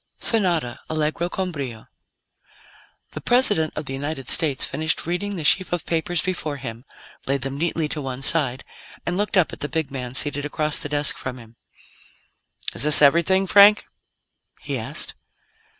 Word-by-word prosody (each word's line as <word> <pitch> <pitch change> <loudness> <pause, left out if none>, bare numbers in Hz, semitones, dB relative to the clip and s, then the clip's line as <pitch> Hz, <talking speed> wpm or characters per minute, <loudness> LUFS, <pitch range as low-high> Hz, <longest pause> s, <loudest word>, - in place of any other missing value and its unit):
SONATA 175 - +1
ALLEGRO 155 +2 -2
CON 185 0 -3
BRIO 130 -8 -7 1.3
The - - -8
President 205 -11 +2
of 150 - -5
the 135 - -6
United 135 -1 -5
States 150 -5 +3
finished 160 +3 -2
reading 195 +4 -3
the 165 - -5
sheaf 185 +5 +2
of 175 -2 -3
papers 165 +1 -1
before 165 -6 -3
him, 120 -2 -8 0.4
laid 140 -1 0
them 135 0 -4
neatly 165 +1 -1
to 150 - -4
one 135 -1 -6
side, 135 -5 +4 0.4
and 175 - -2
looked 205 +1 -1
up 180 - +2
at - - -9
the 145 - -2
big 160 -4 -3
man 125 -2 -6
seated 145 0 +4
across 150 +1 -1
the 145 - -4
desk 145 0 +2
from 130 -1 -6
him. 115 -1 -15 1.2
"Is - - -3
this 150 +1 +7
everything, 170 +6 +4
Frank?" 205 +2 +6 0.7
he - - -5
asked. - - -2
155 Hz, 165 wpm, -22 LUFS, 135-175 Hz, 1.3 s, this